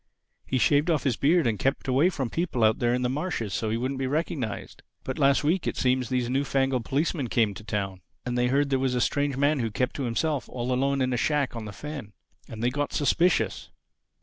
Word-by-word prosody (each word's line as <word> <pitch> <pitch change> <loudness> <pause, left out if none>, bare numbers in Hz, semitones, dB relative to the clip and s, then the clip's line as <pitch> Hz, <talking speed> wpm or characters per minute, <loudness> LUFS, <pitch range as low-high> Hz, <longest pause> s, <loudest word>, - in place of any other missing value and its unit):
He 130 - 0
shaved 145 +7 +3
off 160 -4 +1
his 130 -5 +1
beard 160 +5 +3
and 110 -3 0
kept 135 +1 0
away 135 +7 +4
from 135 -9 -3
people 165 -9 -1
out 110 0 +4
there 120 0 +2
on 125 - -1
the - - +2
marshes 135 - -2
so 110 +2 -1
he 110 - 0
wouldn't 130 +3 -2
be 135 - -1
recognized. 140 -6 -3 0.2
But 130 - -4
last 140 0 +4
week, 165 +4 +1
it - - -2
seems 125 -1 +1
these 125 -2 0
new 135 +3 +1
fangled 135 -3 0
policemen 145 -1 0
came 110 -3 +2
to 105 - -10
Town; 100 -3 -3 0.2
and 125 0 -2
they 125 0 +2
heard 140 +2 +1
there 135 - +2
was 130 -1 0
a - - +1
strange 140 +2 0
man 145 +1 +2
who 115 -2 0
kept 125 +5 -1
to 140 - -2
himself 140 +4 -1
all 125 0 -2
alone 135 +2 +1
in 130 -1 +1
a - - 0
shack 145 -1 0
on 115 -2 -5
the 105 - -6
fen. 140 -1 -7 0.4
And 110 0 -6
they 120 - +2
got 145 +2 -2
suspicious. 170 +4 +1
130 Hz, 235 wpm, -26 LUFS, 120-145 Hz, 0.4 s, away